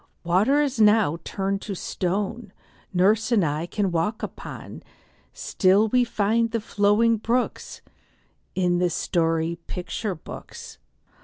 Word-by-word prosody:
Water 220 +13 +3
now 210 -6 +5
is 170 - -7
turned 195 0 -2
to 200 - -5
stone 195 +4 -3 0.4
Nurse 205 +6 +2
and 210 -7 +4
I 150 +3 -2
can 195 0 -1
walk 170 +7 -1
upon; - - -8 0.5
Still 200 +3 +2
we 250 +2 +3
find 230 0 +1
the 230 0 -1
flowing 210 +2 +2
brooks 240 +4 -2 0.7
In 180 -1 +1
the 180 - +2 0.8
picture 180 -2 -6 0.2
story - - -1
books. - - -10
205 Hz, 125 wpm, -24 LUFS, 180-225 Hz, 0.8 s, now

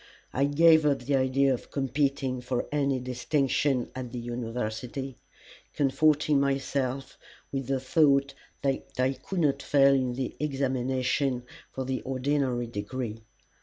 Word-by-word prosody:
I 140 - +2
gave 160 +2 +5
up 140 -4 +1
the 140 +3 +1
idea 135 +1 +3
of 125 - -6
competing 135 -1 -1
for 125 0 -2
any 140 -3 +1
distinction 130 +1 0
at 125 -2 -6
the 125 - -5
University, 120 +2 -4 0.6
comforting 150 +1 +3
myself 135 -1 -1 0.3
with 135 -2 -3
the 135 -1 0
thought 140 0 +3 0.3
that 135 -1 +1 0.2
I 130 +1 +2
could 180 +6 -4
not 140 -2 +2
fail 140 -1 +5
in 130 -2 +1
the 130 0 -4
examination 130 -2 0 0.3
for 130 - -4
the 130 -1 -2
ordinary 130 -2 0
degree. 115 +1 -5
135 Hz, 130 wpm, -28 LUFS, 125-140 Hz, 0.6 s, gave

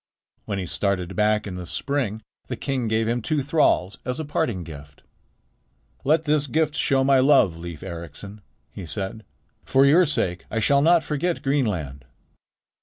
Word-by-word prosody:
When 100 - -3
he 95 - -3
started 95 -1 -2
back 105 0 +2
in 100 - -5
the 90 -1 -7
spring, 110 0 -2 0.2
the 125 - -3
king 130 -1 -2
gave 110 0 +1
him 120 +1 0
two 150 +4 -1
thralls 130 - +1
as 125 +3 -3
a 155 - -3
parting 115 -10 -1
gift. 75 -3 -12 1.0
"Let 155 +3 +3
this 150 -1 +1
gift 155 +2 +1
show 135 -3 +2
my 135 0 +4
love, 130 - +4
Leif 85 -1 -8
Ericsson," 85 +3 -8 0.3
he 90 - -8
said. 100 +5 -5 0.4
"For 135 +1 +4
your 165 +5 +5
sake 90 - -2
I - - -4
shall 140 +5 +3
not 165 +2 +4
forget 155 +4 -2
Greenland." 90 - -1
115 Hz, 165 wpm, -24 LUFS, 90-140 Hz, 1.0 s, your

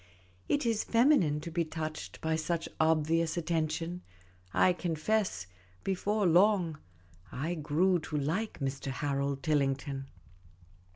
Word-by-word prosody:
It 290 -2 +1
is 225 -2 +1
feminine 230 - +3
to 170 - -6
be 170 +1 +1
touched 155 -1 -6
by 160 0 0
such 165 +1 -2
obvious 160 +1 +2
attention; 165 +1 -1 0.5
I 180 - +4
confess, 175 - -1 0.4
before 200 +2 0
long, 175 -2 +4 0.5
I 155 +7 -2
grew 170 +4 +2
to 150 - -1
like 165 +10 -2
Mr. 135 -1 -3
Harold 140 0 -2
Tillington. 140 -2 0
160 Hz, 115 wpm, -31 LUFS, 150-180 Hz, 0.5 s, I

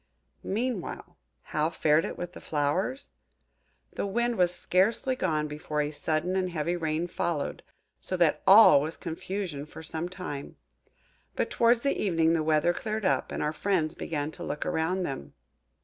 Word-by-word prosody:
Meanwhile, 225 -2 -3 0.2
how 155 +1 0
fared 155 -1 +2
it - - -5
with 175 0 -5
the - - -10
flowers? 160 - -1 0.8
The - - -2
Wind 235 +4 0
was 180 -3 +3
scarcely 205 +9 +1
gone 155 -9 0
before 150 0 -4
a 150 0 0
sudden 160 +4 -1
and 185 -1 0
heavy 170 0 -1
rain 160 0 -1
followed, 170 -3 -2 0.4
so 185 - -3
that 170 -3 +3
all 195 -8 +9
was 155 +3 -4
confusion 170 -2 -4
for 160 - -10
some 160 +2 -4
time. 180 -7 -6 0.8
But - - -1
towards 235 0 +4
the 280 - +1
evening 165 -4 +3
the 165 - +2
weather 155 +2 +2
cleared 215 +2 -3
up, - - +1
and - - -2
our 150 +1 0
friends 165 -2 0
began 150 -1 -3
to - - -9
look 150 - -3
around 180 +4 0
them. 70 - -5
170 Hz, 165 wpm, -28 LUFS, 155-190 Hz, 0.8 s, all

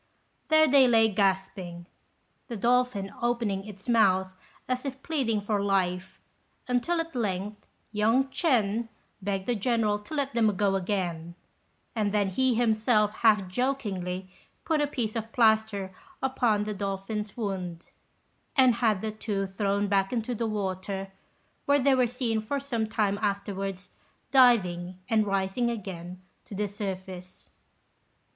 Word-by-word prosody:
There 315 0 +5
they 270 -2 +6
lay 225 -2 +5
gasping, 190 -3 -1 0.6
the 235 - -5
dolphin 240 -3 +1
opening 235 -5 0
its 200 0 -11
mouth 190 -5 +3 0.3
as 255 0 -1
if 270 -1 -6
pleading 250 -9 0
for 205 0 0
life, 190 -2 -1 0.5
until 250 +8 +1
at 330 0 -3
length 205 -3 -3 0.2
young 225 +5 +3
Ch'ên 235 - +1 0.3
begged 195 -1 -2
the 245 - +1
General 220 -1 +1
to 210 +9 -8
let 280 -3 -1
them 220 -3 +2
go 200 -1 +2
again; 175 -4 -2 0.6
and 210 -2 0
then 205 -2 +1
he 255 +6 +2
himself 220 -2 +2
half 210 -4 +4
jokingly 190 -6 -2 0.4
put 315 -3 +1
a 295 - +2
piece 240 -6 -3
of 225 0 -4
plaster 220 -5 +2 0.3
upon 240 -5 +1
the 210 0 -3
dolphin's 200 +2 -4
wound, 185 -6 -4 0.7
and 260 -3 +6
had 215 -5 +2
the 220 - -2
two 210 -2 -2
thrown 200 +1 0
back 195 -1 +1
into 245 0 -1
the 230 0 -2
water, 195 -2 -3 0.5
where 285 0 +4
they 275 0 +3
were 255 -2 +3
seen 235 -2 -1
for 280 +6 -2
some 240 -5 -2
time 205 -2 0
afterwards 195 -2 -3 0.4
diving 185 -9 +4
and 215 -2 +2
rising 195 +5 0
again 185 -5 -6 0.2
to 205 - -9
the 210 +1 -1
surface. 190 -3 -7
210 Hz, 140 wpm, -28 LUFS, 195-240 Hz, 0.7 s, they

